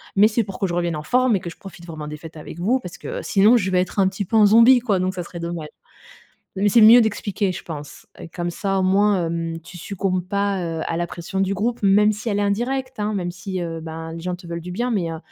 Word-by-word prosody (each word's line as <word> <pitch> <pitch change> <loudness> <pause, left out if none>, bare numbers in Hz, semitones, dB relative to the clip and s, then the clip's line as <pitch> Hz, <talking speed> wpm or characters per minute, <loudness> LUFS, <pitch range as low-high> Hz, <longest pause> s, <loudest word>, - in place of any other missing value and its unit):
Mais 205 +2 +6
c'est 225 +1 0
pour 195 -2 -8
que - - +1
je 175 - -4
revienne 175 -2 -1
en 150 - -5
forme 250 +4 +2
et - - 0
que 170 - -6
je - - -14
profite 175 -3 -12
vraiment 155 -2 -7
des 150 0 -6
fêtes 160 +1 -11
avec 155 +1 -9
vous 230 +9 +1
parce 180 -7 -9
que - - -6
sinon, 210 +4 +4
je 190 -4 -1
vais 180 0 +3
être 185 +2 -3
un 190 - +4
petit 200 +1 -4
peu 225 - -3
un 215 - +7
zombie, 230 +4 +7
quoi, 215 -6 0
donc 185 +1 -1
ça 180 - -4
serait 170 0 -9
dommage». 170 -2 -5 0.9
Mais 205 +2 +2
c'est 235 - +5
mieux 225 +3 +9
d'expliquer, 205 -3 -1
je - - -7
pense. 150 -3 -9 0.3
Comme 175 -1 -2
ça, 195 +2 -2
au - - +1
moins, 195 -1 +3
hem, 165 0 -3
tu 175 +2 -12
succombes 185 0 -2
pas, 200 0 0 0.2
heu, - - -2
à 165 - -2
la 170 0 -1
pression 175 +3 -5
du 195 0 +1
groupe, 230 +5 -1
même 205 +2 +5
si 215 +3 -5
elle 205 0 0
est - - +1
indirecte, 255 +5 -2
hein. 210 +1 -1
Même 180 -3 -2
si, 185 +1 -5
heu, 165 -1 -5
ben, 160 0 -7
les 165 - -7
gens 180 +1 -3
te 175 0 -14
veulent 170 0 -4
du 180 +1 -7
bien 240 +7 -1
mais 180 -7 -1
heu, 160 - -6
190 Hz, 280 wpm, -22 LUFS, 170-210 Hz, 0.9 s, mieux